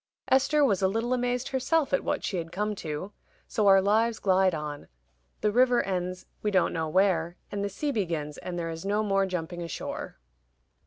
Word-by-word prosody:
Esther 280 +3 +4
was 200 -7 +1
a 190 - +4
little 225 +5 0
amazed 245 0 -1
herself 275 +2 +1
at 275 - +2
what - - -1
she 190 - -2
had 165 -1 -4
come 210 +3 -1
to. 165 0 -5 0.4
So 215 -3 +1
our 195 -1 +7
lives 220 +3 +2
glide 190 -2 +3
on: 150 -1 -6 0.5
the 210 - +2
river 245 +1 +4
ends 185 -1 -3 0.2
we 210 - 0
don't 190 -3 +2
know 160 -1 -2
where, 175 -2 +2
and 200 0 -2
the 200 - -1
sea 285 +9 -2
begins, 165 - -2
and 180 -1 -5
there 165 -1 -2
is 165 0 -7
no 205 +2 +1
more 195 -2 +2
jumping 175 -1 -4
ashore. 170 -3 -5
195 Hz, 195 wpm, -28 LUFS, 175-225 Hz, 0.5 s, our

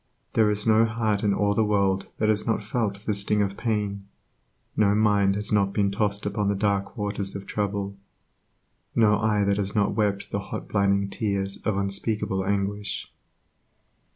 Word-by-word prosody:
There 110 -2 +4
is 105 0 -1
no 110 0 +5
heart 110 -2 0
in 105 - +3
all 100 0 +2
the 110 - +2
world 100 -2 +1
that 110 - +1
has 110 +1 +1
not 115 -2 0
felt 105 -2 -2
the 105 - +1
sting 100 +1 +2
of 100 0 -3
pain, 105 -4 -2 0.7
no 105 -1 +3
mind 100 -2 +3
has 105 +1 -2
not 100 -2 +2
been 100 -2 +1
tossed 100 0 -1
upon 105 0 -1
the 100 - +1
dark 100 +2 -1
waters 100 -2 -3
of 100 0 -6
trouble, 100 -1 -2 1.0
no 105 -2 +4
eye 105 -1 +2
that 100 0 +1
has 100 -1 -2
not 105 -1 +2
wept 100 -2 -1
the 100 - -1
hot 100 - -6
blinding 100 -1 +2
tears 100 -2 -2
of 105 -3 -2
unspeakable 100 0 -1
anguish. 100 +1 -2
100 Hz, 175 wpm, -25 LUFS, 100-105 Hz, 1.0 s, no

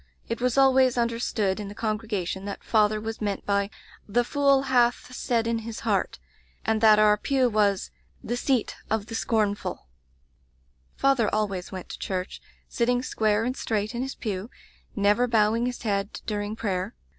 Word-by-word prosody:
It 230 +1 -3
was 250 0 +1
always 265 -2 +5
under 235 -1 0
stood 205 -4 0
in 205 - -5
the 205 - -9
congregation 210 -4 -2
that 200 - -6
father 215 -1 +2
was 220 +1 -5
meant 205 -2 -2
by 200 0 +1 0.4
^the 240 +4 +2
fool 275 0 +3
hath 250 -1 +2
said 235 -3 0
in 230 0 0
his 225 0 -7
heart/ - - 0 0.5
and 220 -1 +1
that 215 -1 +7
our 210 0 +5
pew 260 +3 +2
was 205 -4 +1 0.3
'the 240 - -2
seat 255 -2 0
of 220 -1 0
the 225 - -9
scorn 220 -2 +1
ful' 205 - -6 1.1
"Father 270 -5 +2
always 200 -4 -2
went 185 -1 -7
to - - -7
church; 185 -1 -4 0.3
sitting 245 +1 0
square 215 -3 +1
and 250 +2 -1
straight 215 -2 -2
in 240 - -3
his 265 +1 -4
pew, 205 -1 -4 0.5
never 210 +4 +3
bowing 225 +1 +2
his 250 -1 -5
head 200 -2 -1
during 210 0 -3
prayer. 195 -1 -2
220 Hz, 170 wpm, -26 LUFS, 205-240 Hz, 1.1 s, that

